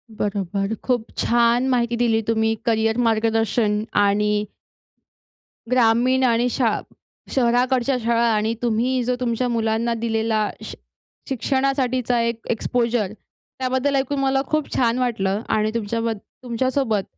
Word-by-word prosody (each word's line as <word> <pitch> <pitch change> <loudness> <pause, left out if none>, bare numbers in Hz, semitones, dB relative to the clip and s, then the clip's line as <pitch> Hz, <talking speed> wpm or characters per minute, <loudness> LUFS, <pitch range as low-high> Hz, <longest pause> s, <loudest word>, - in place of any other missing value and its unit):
बरोबर, 200 0 -2
खूप 245 -3 0
छान 235 +2 +2
माहिती 240 -2 +1
दिली 230 -2 +2
तुम्ही 220 0 +2
करियर 225 0 +1
मार्गदर्शन 225 -1 +1 0.2
आणि 210 +1 +1 1.2
ग्रामीण 250 +2 +3
आणि 240 0 +3
शा 230 -4 +1 0.5
शहराकडच्या 250 +1 +2
शाळा 235 0 +2
आणि 215 +1 0
तुम्ही 245 +2 +1
जो 250 +1 0
तुमच्या 245 0 -1
मुलांना 230 0 0
दिलेला 220 -2 0 0.2
शि - - -7 0.5
शिक्षणासाठीचा 255 -2 0
एक 230 0 -1
एक्सपोजर 230 -3 0
त्याबद्दल 260 +5 -3
ऐकून 275 +1 0
मला 270 0 +2
खूप 310 -1 -1
छान 240 0 +2
वाटलं 210 -5 0
आणि 215 0 +1
तुमच्याबद 230 0 -2 0.3
तुमच्यासोबत 245 -3 0
235 Hz, 115 wpm, -22 LUFS, 220-250 Hz, 1.2 s, ग्रामीण